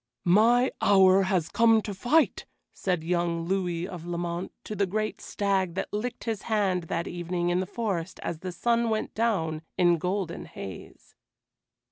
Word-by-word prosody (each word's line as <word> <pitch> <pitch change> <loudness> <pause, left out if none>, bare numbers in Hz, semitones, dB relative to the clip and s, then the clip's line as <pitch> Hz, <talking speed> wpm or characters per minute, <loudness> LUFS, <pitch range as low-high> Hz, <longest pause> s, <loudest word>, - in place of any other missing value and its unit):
"My 230 +8 +5
hour 190 -1 +6
has 180 -5 +1
come 225 +1 +4
to 205 - -4
fight," 265 +11 +2 0.3
said 180 -4 -1
young 170 0 0
Louis 180 -2 -1
of 180 -4 -8
Lamont 175 +1 -3
to 215 - -6
the 200 -1 +1
great 215 +3 -2
stag 190 -4 -1
that - - -4
licked 235 +4 -3
his 225 -3 -2
hand 195 -5 +1
that 165 +1 -2
evening 175 0 -2
in 175 +1 +1
the 185 - -2
forest 190 -7 -3
as 165 - -3
the 185 +1 -5
sun 235 +6 +1
went 220 -1 -2
down 175 -9 0 0.2
in 175 -2 +4
golden 180 -1 -2
haze. 95 -3 -10
185 Hz, 160 wpm, -27 LUFS, 175-215 Hz, 0.3 s, hour